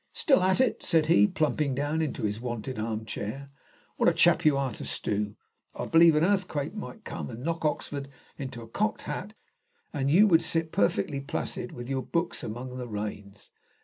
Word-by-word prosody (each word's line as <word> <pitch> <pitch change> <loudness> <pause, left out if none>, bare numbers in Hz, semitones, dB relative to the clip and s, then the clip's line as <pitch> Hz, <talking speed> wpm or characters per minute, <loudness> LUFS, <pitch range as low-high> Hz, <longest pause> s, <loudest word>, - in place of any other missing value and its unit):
"Still 270 - +3
at 185 +3 +3
it!" 260 -3 +2
said 160 -2 +2
he, 170 +6 +5
plumping 155 -6 0
down 145 +3 0
into 150 -8 -2
his 105 +1 -1
wonted 120 0 -4
arm 110 0 -3
chair. 135 +7 -5 0.5
"What - - +5
a - - +1
chap 170 +1 +4
you 150 -3 +4
are 135 -2 0
to - - -8
stew! 100 +10 -2 0.4
I - - -3
believe 165 -1 +6
an 150 - +3
earthquake 180 -6 0
might 220 +1 -8
come - - -5
and 120 +1 -8
knock 165 +1 -2
Oxford 145 -2 -2 0.3
into 130 -4 -6
a - - -11
cocked 215 - -1
hat, 205 +4 -5 0.6
and 140 -2 0
you 185 +8 +7
would 170 -5 +5
sit 165 0 -1
perfectly 100 +7 +1
placid 135 -2 -4
with 120 0 -7
your 135 0 -1
books 170 +5 -2
among 125 +3 -6
the 125 -1 -5
rains. 105 -2 -6
140 Hz, 190 wpm, -28 LUFS, 120-165 Hz, 0.6 s, you